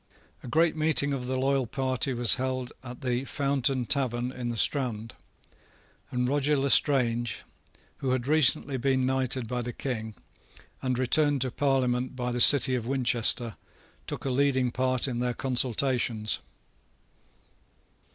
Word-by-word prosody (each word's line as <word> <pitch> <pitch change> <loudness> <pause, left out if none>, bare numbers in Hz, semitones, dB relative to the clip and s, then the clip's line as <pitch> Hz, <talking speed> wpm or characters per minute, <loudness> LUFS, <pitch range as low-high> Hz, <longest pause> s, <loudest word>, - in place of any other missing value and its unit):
A - - -10
great 160 +6 +2
meeting 155 -2 0
of 125 -2 -4
the 130 0 -2
loyal 135 -1 0
party 130 +1 -2
was 120 -2 +4
held 130 -1 -3
at 125 +2 -10
the 125 -1 -1
Fountain 135 -2 -1
Tavern 125 -2 -1
in 125 -2 -5
the 120 - -4
Strand; 115 -4 0 1.0
and 125 -2 -1
Roger 145 +2 +1
Lestrange, 125 -5 +2 0.5
who 135 - -3
had 130 -1 -1
recently 145 -2 +2
been 130 0 +1
knighted 130 -2 -1
by 125 +1 -3
the 120 +1 -4
King, 110 -5 -5 0.7
and 130 -2 -1
returned 140 +2 +1
to 130 -1 -1
Parliament 130 -2 0
by 125 -1 -3
the 120 0 -1
city 130 -1 +6
of 120 -2 -2
Winchester, 125 -3 +2 0.5
took - - -6
a 135 - -1
leading 130 -2 +1
part 130 +1 0
in 120 -3 -3
their 125 0 -1
consultations. 125 -3 0
130 Hz, 140 wpm, -27 LUFS, 120-135 Hz, 1.0 s, city